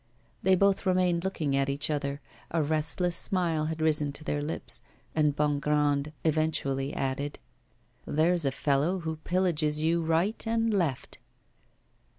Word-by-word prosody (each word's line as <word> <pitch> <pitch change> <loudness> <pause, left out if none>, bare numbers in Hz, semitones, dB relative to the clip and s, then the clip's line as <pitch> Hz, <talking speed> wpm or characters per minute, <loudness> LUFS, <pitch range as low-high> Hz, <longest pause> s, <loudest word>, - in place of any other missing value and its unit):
They 190 0 +4
both 200 +1 +2
remained 180 -2 +2
looking 155 -7 -1
at 135 0 +1
each 145 +3 -1
other: 140 -1 -2 0.3
a 165 -2 +1
restless 160 +4 0
smile 170 -5 +1
had 160 0 -3
risen 150 -2 +2
to 155 - -6
their 145 -1 -1
lips, 150 +2 -4 0.3
and 150 -2 +2
Bongrand 150 0 +1
eventually 150 -4 0
added: 140 +2 -2 0.7
'There's 165 +3 +2
a 135 - +1
fellow 145 +7 +1
who 160 -1 -4
pillages 155 -3 0
you 165 +1 +2
right 165 +6 0
and 225 0 +1
left. 165 -10 -1
155 Hz, 140 wpm, -28 LUFS, 145-175 Hz, 0.7 s, They